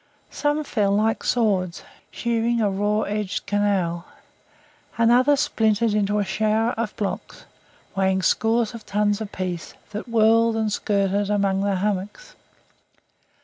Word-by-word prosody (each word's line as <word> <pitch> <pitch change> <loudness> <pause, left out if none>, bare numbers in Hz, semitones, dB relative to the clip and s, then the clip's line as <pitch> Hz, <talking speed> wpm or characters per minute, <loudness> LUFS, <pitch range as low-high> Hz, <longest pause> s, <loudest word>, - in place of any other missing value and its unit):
Some 295 +1 0
fell 210 -8 0
like 220 +2 +1
swords, 195 -7 0 0.3
shearing 235 0 -1
a 210 -3 +1
raw 205 +2 0
edged 210 -2 -3
canal; 195 -4 0 0.9
and 230 0 +4
others 265 +3 +4
splintered 220 0 +1
into 210 0 +1
a 205 - +1
shower 220 +3 +1
of 225 -2 -4
blocks, 200 -2 -5 0.5
weighing 190 -1 +1
scores 225 +2 +1
of 230 -2 -9
tons 205 +1 0
apiece, 185 -4 -5 0.2
that 210 +3 -6
whirled 230 0 +4
and 220 -2 -1
skirted 200 -1 0
among 200 -2 +1
the 200 -1 0
hummocks. 205 - -3
210 Hz, 130 wpm, -23 LUFS, 200-225 Hz, 0.9 s, and